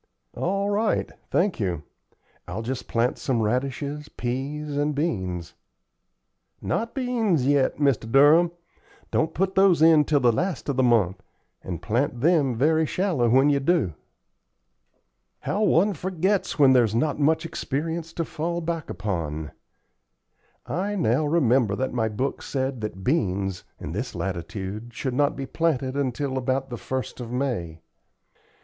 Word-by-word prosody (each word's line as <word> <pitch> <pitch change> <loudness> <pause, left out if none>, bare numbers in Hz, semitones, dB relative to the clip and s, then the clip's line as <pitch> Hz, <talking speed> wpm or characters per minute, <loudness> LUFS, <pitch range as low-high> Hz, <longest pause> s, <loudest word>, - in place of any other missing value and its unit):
"All 195 +2 -1
right. 210 +1 0 0.2
Thank 190 -3 +1
you. 90 -7 -2 0.6
I'll 95 +6 -4
just 125 +2 -4
plant 120 +2 0
some 130 -4 0
radishes, 140 +6 -2
peas, 140 +4 -4
and 145 +1 0
beans." 95 - -2 1.1
"Not 230 +1 -2
beans 230 - +1
yet, 140 -1 +2
Mr. 135 -6 +1
Durham. 150 +6 +6 0.6
Don't 160 - 0
put 190 +2 0
those 190 -4 +5
in 160 -1 +6
till 145 -1 +2
the 125 -2 +4
last 175 - -2
of 140 - 0
the 130 - +2
month, 110 -7 +2 0.4
and 85 -2 -6
plant 120 - 0
them 145 -4 +3
very 155 +5 +2
shallow 170 -12 +1
when 135 +5 +5
you 140 - +2
do." 140 - +1 1.5
"How 205 - -1
one 205 0 +3
forgets 185 +3 -1
when 135 -3 +6
there's 115 -4 +3
not 150 +5 0
much 155 +3 +2
experience 160 +1 -3
to 165 - -2
fall 170 +2 -3
back 165 -2 -3
upon! 80 -7 -3 1.1
I 200 +4 -2
now 150 - +1
remember 130 -9 +3
that 130 +3 -2
my 110 -2 0
book 130 +6 -2
said 130 -3 -3
that 95 -3 -5
beans, 95 - 0 0.2
in - - -6
this - - -4
latitude, 100 +5 -5
should 130 - -2
not 145 +2 +2
be 135 - -4
planted 135 -4 -1
until 135 0 -1
about 130 +1 -1
the 120 - -4
1st 130 +3 -4
of 120 -2 -6
May." 115 - -2
135 Hz, 145 wpm, -25 LUFS, 115-160 Hz, 1.5 s, Durham